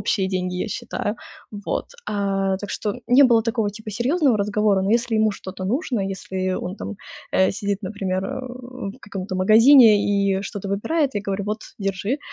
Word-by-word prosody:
общие 190 Hz, -3 st, 0 dB
деньги, 180 Hz, -1 st, -2 dB
я 200 Hz, -, -2 dB
считаю. 205 Hz, 0 st, -3 dB, 0.4 s
Вот. 205 Hz, -2 st, -3 dB, 0.2 s
А, 195 Hz, -2 st, 0 dB
так 205 Hz, -, -6 dB
что 210 Hz, -, -2 dB
не 260 Hz, +3 st, +7 dB
было 235 Hz, -3 st, +5 dB
такого 225 Hz, -2 st, 0 dB
типа 215 Hz, +1 st, -8 dB
серьезного 260 Hz, -, +2 dB
разговора, 205 Hz, -1 st, +1 dB
но 195 Hz, -, 0 dB
если 235 Hz, 0 st, +2 dB
ему 215 Hz, -1 st, +3 dB
что-то 185 Hz, -1 st, -7 dB
нужно, 245 Hz, -, -1 dB
если 185 Hz, -1 st, -3 dB
он 185 Hz, +1 st, -4 dB
там, 215 Hz, -, -6 dB, 0.4 s
э, 190 Hz, -, +4 dB
сидит, 200 Hz, 0 st, -3 dB
например, 190 Hz, -1 st, -2 dB
э, 195 Hz, -, -4 dB, 0.6 s
в -, -, -21 dB
каком-то 190 Hz, -3 st, -6 dB
магазине 225 Hz, +4 st, +7 dB
и 200 Hz, -1 st, +1 dB
что-то 200 Hz, -1 st, -6 dB
выбирает, 280 Hz, +10 st, 0 dB
я 205 Hz, -, -2 dB
говорю: 200 Hz, 0 st, -2 dB
"Вот, 210 Hz, +2 st, -2 dB, 0.2 s
держи". 200 Hz, +6 st, -2 dB
205 Hz, 175 wpm, -22 LUFS, 195-225 Hz, 0.6 s, не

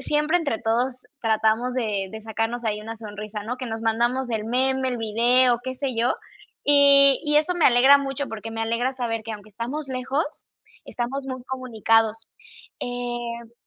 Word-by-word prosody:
siempre 300 Hz, +3 st, +1 dB
entre 285 Hz, -10 st, -2 dB
todos 245 Hz, +3 st, 0 dB, 0.2 s
tratamos 220 Hz, +2 st, +1 dB
de 210 Hz, -6 st, -1 dB
de 220 Hz, -, -7 dB
sacarnos 225 Hz, +2 st, -3 dB
ahí 210 Hz, -1 st, -1 dB
una 225 Hz, +1 st, -6 dB
sonrisa, 210 Hz, -1 st, -7 dB
¿no? 245 Hz, +4 st, -4 dB
Que 255 Hz, -, -6 dB
nos 225 Hz, -1 st, -4 dB
mandamos 240 Hz, +3 st, +1 dB
el 220 Hz, -2 st, -2 dB
meme, 260 Hz, +3 st, +1 dB
el 245 Hz, -2 st, -2 dB
video, 240 Hz, +3 st, +3 dB
qué 260 Hz, -, -3 dB
sé 260 Hz, -2 st, -3 dB
yo, 235 Hz, +2 st, +2 dB, 0.5 s
y 280 Hz, -1 st, +6 dB
y 295 Hz, 0 st, +2 dB
eso 310 Hz, +4 st, +2 dB
me 345 Hz, -, +1 dB
alegra 260 Hz, +3 st, +7 dB
mucho, 275 Hz, 0 st, -3 dB
porque 225 Hz, 0 st, -6 dB
me 225 Hz, -, -4 dB
alegra 235 Hz, +3 st, 0 dB
saber 235 Hz, -3 st, -3 dB
que 225 Hz, -, -5 dB
aunque 210 Hz, 0 st, -9 dB
estamos 255 Hz, +8 st, -5 dB
lejos, 260 Hz, +3 st, -1 dB, 0.6 s
estamos 260 Hz, +3 st, -4 dB
muy 260 Hz, -2 st, -6 dB
comunicados, 225 Hz, -4 st, 0 dB, 0.5 s
eh 240 Hz, -1 st, -4 dB
240 Hz, 170 wpm, -24 LUFS, 225-265 Hz, 0.6 s, alegra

